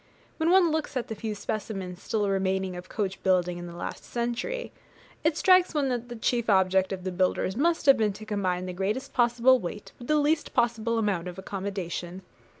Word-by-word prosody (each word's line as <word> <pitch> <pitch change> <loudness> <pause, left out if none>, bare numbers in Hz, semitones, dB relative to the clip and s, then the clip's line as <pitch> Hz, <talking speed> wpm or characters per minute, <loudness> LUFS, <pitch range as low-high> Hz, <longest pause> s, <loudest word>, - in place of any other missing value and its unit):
When 320 0 +1
one 360 -2 +5
looks 310 -3 -2
at 245 - -3
the - - -2
few 215 0 -4
specimens 200 -3 -5
still 210 -2 -1
remaining 190 -1 0
of 180 +1 -9
coach 195 -3 -3
building 180 -2 +1
in 175 - -7
the 170 - -9
last 175 - -6
century, 240 - -3 0.5
it 315 0 +2
strikes 370 -2 +5
one 280 -3 +1
that 245 -1 -3
the 240 - -6
chief 235 +1 0
object 190 -1 +3
of 190 -2 -4
the 185 - -2
builders 185 +1 0
must 330 +6 +1
have 275 -2 +7
been 215 -3 +1
to 215 +2 -10
combine 185 -4 -1
the 180 - -5
greatest 195 +8 -2
possible 245 +1 +4
weight 210 +1 -7
with 240 - -9
the 305 - +3
least 295 +1 +1
possible 230 -1 +1
amount 200 -6 0
of 180 0 -7
accommodation. 190 -2 -5
210 Hz, 200 wpm, -27 LUFS, 185-245 Hz, 0.5 s, have